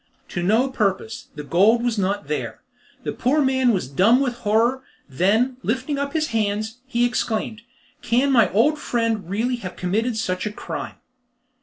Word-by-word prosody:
To 175 - -3
no 220 +9 +3
purpose. 215 -2 -2
The 150 - -6
gold 210 +10 +3
was 235 -3 0
not 195 -4 -1
there. 150 - -4 0.4
The - - -2
poor 275 +5 +1
man 260 -2 +3
was 185 - -1
dumb 195 - +4
with 265 -3 0
horror, 235 +4 +1 0.3
then, 210 - +1
lifting 260 +5 -2
up 280 0 -3
his 310 -1 0
hands, 220 +1 -1
he 240 -2 +1
exclaimed, 225 -2 -2 0.4
"Can 255 +4 +2
my 230 -7 +4
old 295 +10 +3
friend 230 - -1
really 235 +6 0
have 185 -6 -7
committed 220 +6 -1
such 185 -2 -2
a - - -3
crime?" - - -6
225 Hz, 165 wpm, -22 LUFS, 200-250 Hz, 0.4 s, dumb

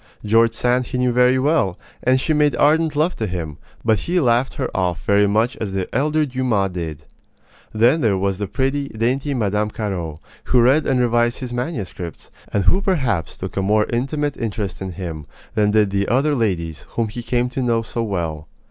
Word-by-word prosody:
George 115 +2 +4
Sand 125 +1 +1
he 130 - -3
knew 125 0 +2
very 125 +1 +4
well, 130 - +1 0.2
and 130 +1 +3
she 155 - 0
made 150 -1 +3
ardent 155 +1 +3
love 160 +5 +1
to 110 - -2
him; 80 -5 -5 0.3
but 110 -3 +3
he 175 - 0
laughed 125 -2 +2
her - - -1
off 90 -3 -1
very 100 0 +4
much 110 +5 +1
as 100 -3 -4
the 95 -2 -2
elder 150 +3 +2
Dumas 125 -8 0
did. 80 -4 -5 0.7
Then 120 +9 +3
there 105 -6 +2
was 95 0 -1
the 105 - -2
pretty, 135 +7 -1
dainty 130 +6 -1
Mme. 105 -2 0
Carraud, 90 -8 -4 0.3
who 125 - +3
read 135 +6 +4
and 130 -2 +2
revised 120 0 +2
his 125 -1 -5
manuscripts, 110 - -5 0.2
and 100 - +1
who 185 - +3
perhaps 130 - 0
took - - -6
a 95 - 0
more 105 +2 +2
intimate 145 +4 -1
interest 105 -5 -4
in 95 -1 -4
him 80 -5 -6 0.3
than 105 -1 +2
did 105 -1 +3
the 100 0 0
other 140 +5 +2
ladies 85 - -2
whom 115 -1 0
he 120 +3 -6
came 120 +1 0
to 130 +1 -3
know 115 -2 +1
so 115 +1 -4
well. 85 -8 -3
115 Hz, 195 wpm, -20 LUFS, 100-130 Hz, 0.7 s, George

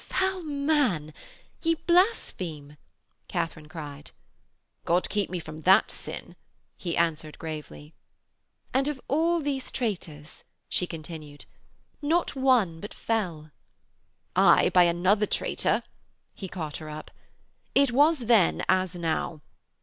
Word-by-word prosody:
'Foul 380 0 0
man, 280 - +1 0.5
ye 330 0 +2
blaspheme,' 190 - 0 0.5
Katharine 155 -2 -3
cried. 150 -3 -8 0.7
'God 175 +2 +2
keep 205 -2 0
me 180 - -3
from 155 -1 -9
that 190 +4 +5
sin,' - - -7 0.4
he 170 -2 -3
answered 160 -2 0
gravely. 155 -1 -7 0.4
' - - -39
And 270 +2 +2
of 295 -3 -2
all 330 +4 +2
these 275 -3 -2
traitors,' 165 - -4 0.2
she 180 - 0
continued, 155 -3 -9 0.6
'not 320 +3 +1
one 245 -11 +3
but 205 - -8
fell.' 175 -9 -2 0.8
'Aye, - - +6
by 180 -1 +7
another 185 +5 +2
traitor,' - - 0 0.5
he 195 - -7
caught 160 -6 -5
her 155 -1 -8
up. 155 0 -8 0.6
'It 275 -2 +5
was 290 +3 +4
then 225 -6 +3
as 185 -1 +2
now. 165 -2 -2
180 Hz, 120 wpm, -27 LUFS, -, 0.8 s, by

